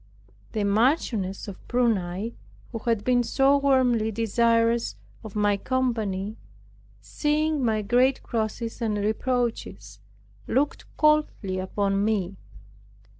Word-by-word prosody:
The 215 - -1
Marchioness 210 - +1
of 200 - -8
Prunai, 220 -3 0 0.4
who 230 - -4
had 225 -2 -1
been 250 +1 +3
so 270 +4 +3
warmly 255 -5 +2
desirous 230 +1 +1 0.3
of 220 -2 -9
my 205 -1 +2
company, 220 -5 -2 0.6
seeing 300 - 0
my 220 -2 +1
great 250 +5 +2
crosses 225 0 -3
and 215 -2 0
reproaches, 215 - -2 0.5
looked 280 +4 0
coldly 300 -11 +2
upon 195 +1 0
me. 200 -3 0
225 Hz, 105 wpm, -25 LUFS, 200-250 Hz, 0.6 s, been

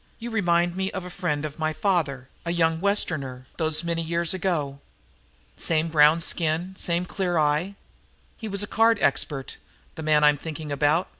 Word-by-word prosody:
"You 235 +1 -6
remind 175 -5 +2
me 190 0 -1
of 190 -2 -4
a 180 - -8
friend 160 -6 -2
of 150 +1 -7
my 155 0 0
father, 155 -6 0 0.2
a 170 - -4
young 165 -1 +1
Westerner, 150 -11 0
those 160 -1 +1
many 170 -1 -1
years 170 +1 0
ago. 165 -7 -2 0.8
Same 160 0 0
brown 155 +1 +5
skin, 165 +3 -1
same 175 -1 -1
clear 180 -2 -1
eye. 155 +6 +1 0.6
He 220 - -7
was 200 -1 -2
a - - -4
card 225 +1 +3
expert, 135 0 0 0.4
the - - -8
man 155 -1 +3
I'm 150 0 +5
thinking 155 0 -6
about. 150 +5 +2
165 Hz, 170 wpm, -25 LUFS, 150-180 Hz, 0.8 s, brown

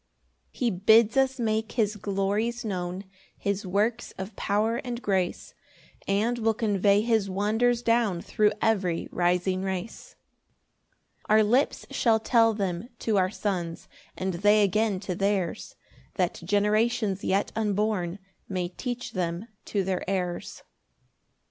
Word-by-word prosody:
2 - - -21
He 240 -3 +1
bids 220 +5 +4
us 265 -1 +2
make 220 -1 -1
his 215 -3 +1
glories 205 +4 -1
known, 180 -2 -3 0.3
His 200 -1 -2
works 210 +5 0
of 190 +2 -6
power 215 +3 0
and 240 -1 -4
grace; 190 -6 -1 0.5
And 220 +5 +1
we'll 225 -1 +1
convey 205 -2 +2
his 220 -3 +1
wonders 220 +5 +1
down 230 -6 +2
Thro' 215 -2 +2
every 190 -6 +1
rising 180 +1 +1
race. 195 - -5 1.1
3 215 - +4
Our 220 - +6
lips 245 +7 +1
shall 225 -2 +3
tell 225 0 +3
them 195 +1 -3
to 220 -2 0
our 185 -1 +3
Sons, 180 -5 -3 0.3
And 190 0 -2
they 205 +4 +4
again 205 0 +1
to 195 -2 -3
theirs, 195 -1 -1 0.4
That 180 -3 -1
generations 210 +1 +1
yet 195 +2 +1
unborn 210 -4 0 0.3
May 180 -2 -2
teach 245 +6 -5
them 180 +4 -3 0.2
to 200 -2 -1
their 185 -1 -2
heirs. 180 -3 -3
205 Hz, 135 wpm, -27 LUFS, 190-225 Hz, 1.1 s, Our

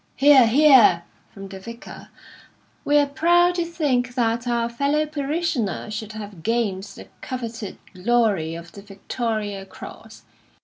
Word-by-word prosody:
("Hear, 275 -4 +6
hear!" 250 - +6 0.3
from 195 0 -10
the 190 0 -9
Vicar.) 230 +4 -11 0.8
We 295 - +3
are 290 - +4
proud 345 +5 +3
to 350 -1 -1
think 265 -7 -1
that 235 -1 0
our 235 -1 0
fellow 280 +6 0
parishioner 290 - -2
should 215 0 -6
have 205 -5 -9
gained 220 -2 -1
the - - -12
coveted 230 -5 -6 0.2
glory 195 -5 0
of 170 0 -10
the 200 - -12
Victoria 205 0 -4
Cross. 195 - -12
235 Hz, 135 wpm, -22 LUFS, 205-280 Hz, 0.8 s, Hear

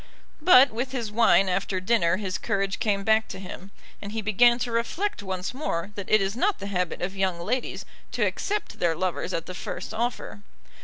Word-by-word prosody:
But 280 -5 +7
with 250 +4 -3
his 235 -5 -3
wine 210 -3 +4
after 185 +1 -1
dinner 185 -3 +2
his 190 -3 -3
courage 195 -1 -1
came 200 -2 0
back 220 +1 +3
to - - -7
him, 190 0 -9 0.3
and 200 - -6
he 225 -1 -3
began 235 +4 +5
to 245 -1 -3
reflect 235 - -1
once 190 +1 -4
more 205 - -3
that 200 -2 -7
it 215 - +5
is 195 +2 -2
not 385 - +1
the 200 - -7
habit 180 -1 -1
of 190 +2 -3
young 190 -3 0
ladies 235 +8 -2 0.3
to - - +1
accept 420 +1 -3
their 170 -2 +2
lovers 185 +1 -2
at 165 -2 -2
the 185 - -7
first 185 - -6
offer. 230 -2 -3
205 Hz, 200 wpm, -26 LUFS, 185-235 Hz, 0.3 s, But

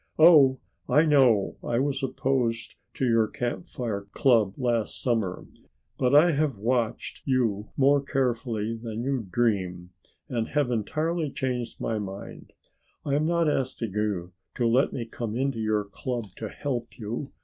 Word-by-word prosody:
Oh, 150 -5 +7 0.3
I 150 +2 +5
know 130 -10 +4
I 120 - -1
was 135 +1 0
opposed 125 -4 -1 0.2
to 130 - 0
your 115 -2 +3
Camp 125 +11 -4
Fire 105 -8 -4
club 115 -7 +3
last 120 -4 -1
summer, 110 -7 -1 0.5
but 125 +2 +3
I 165 +4 +7
have 145 -5 0
watched 115 +1 -1
you 115 -6 0
more 140 +1 +4
carefully 120 -5 -1
than 115 0 -5
you 130 -5 -2
dream 90 -5 0 0.4
and 115 -3 -2
have 145 -4 0
entirely 155 +8 -1
changed 125 -3 -3
my 110 -1 -1
mind. 100 -1 -8 0.5
I 140 - -1
am 150 +2 +2
not 170 -1 +2
asking 130 -6 -1
you 100 -4 -2 0.2
to 120 - 0
let 125 +4 +3
me 120 - -4
come 115 -1 -5
into 135 -1 -1
your 110 -1 +1
club 115 +2 -5
to 110 - -5
help 125 -4 -4
you. 120 +5 -5
120 Hz, 150 wpm, -26 LUFS, 110-135 Hz, 0.5 s, Oh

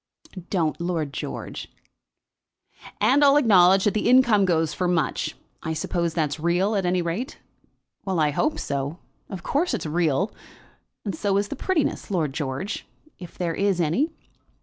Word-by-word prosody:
"Don't, 170 -3 0
Lord 165 -5 -2
George." - - -6 1.3
"And 285 +2 +4
I'll 280 0 +6
acknowledge 190 -7 +5
that 205 - +2
the 215 +2 +1
income 240 -6 +5
goes 160 -4 +1
for 180 - -1
much. 170 -5 0 0.3
I 160 - -3
suppose 170 +1 -2
that's 155 -2 -1
real 175 +6 +1
at 190 -3 0
any 180 0 +1
rate?" 180 - -3 0.7
"Well; 190 -3 -1
I 150 -1 +3
hope 305 - 0
so. 140 +3 -3 0.3
Of 190 -3 -7
course 295 -1 0
it's 220 - -5
real. 165 +4 0 0.7
And 200 - -2
so 195 +4 0
is 205 +1 0
the - - -4
prettiness, 330 0 -1
Lord 160 -8 0
George; 145 +7 -4 0.3
if 175 -2 -11
there 170 -2 -1
is 195 0 +1
any." 175 - +1
180 Hz, 155 wpm, -24 LUFS, 160-205 Hz, 1.3 s, I'll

